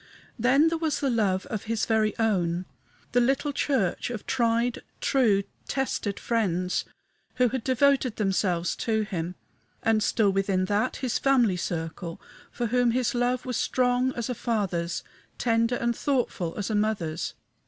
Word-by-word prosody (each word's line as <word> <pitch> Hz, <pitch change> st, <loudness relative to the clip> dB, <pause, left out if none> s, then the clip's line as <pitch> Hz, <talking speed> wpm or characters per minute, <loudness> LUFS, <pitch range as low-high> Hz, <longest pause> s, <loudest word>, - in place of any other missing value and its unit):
Then 275 Hz, +7 st, +4 dB
there 330 Hz, 0 st, -2 dB
was 320 Hz, -2 st, 0 dB
the 275 Hz, -2 st, +1 dB
love 195 Hz, -5 st, +1 dB
of 225 Hz, -7 st, -5 dB
his 225 Hz, 0 st, 0 dB
very 220 Hz, -1 st, +1 dB
own 185 Hz, -6 st, +1 dB, 0.5 s
the 245 Hz, -, +3 dB
little 270 Hz, +4 st, +1 dB
church 260 Hz, -10 st, 0 dB
of 235 Hz, -4 st, -5 dB
tried, 235 Hz, -1 st, +1 dB, 0.2 s
true, 220 Hz, -7 st, +3 dB, 0.2 s
tested 240 Hz, -6 st, -2 dB
friends 185 Hz, -6 st, 0 dB, 0.5 s
who 250 Hz, -1 st, +3 dB
had 260 Hz, -1 st, -3 dB
devoted 260 Hz, -2 st, +2 dB
themselves 190 Hz, -4 st, 0 dB
to 220 Hz, -1 st, 0 dB
him; 180 Hz, -4 st, -4 dB, 0.5 s
and, 225 Hz, -1 st, +3 dB
still 210 Hz, -1 st, +2 dB
within 195 Hz, -1 st, +1 dB
that, 205 Hz, +5 st, 0 dB
his 255 Hz, -3 st, -1 dB
family 245 Hz, -8 st, +3 dB
circle, 165 Hz, 0 st, -4 dB, 0.3 s
for 240 Hz, -, -2 dB
whom 245 Hz, +1 st, +2 dB
his 245 Hz, 0 st, +1 dB
love 245 Hz, +1 st, 0 dB
was 250 Hz, -2 st, -2 dB
strong 250 Hz, 0 st, +2 dB
as 235 Hz, -, -2 dB
a 250 Hz, -, -1 dB
father's, 190 Hz, -8 st, -1 dB, 0.3 s
tender 230 Hz, 0 st, +2 dB
and 235 Hz, -1 st, 0 dB
thoughtful 240 Hz, -, -1 dB
as 205 Hz, +1 st, -2 dB
a -, -, 0 dB
mother's. 200 Hz, -7 st, -1 dB
225 Hz, 155 wpm, -27 LUFS, 195-250 Hz, 0.5 s, Then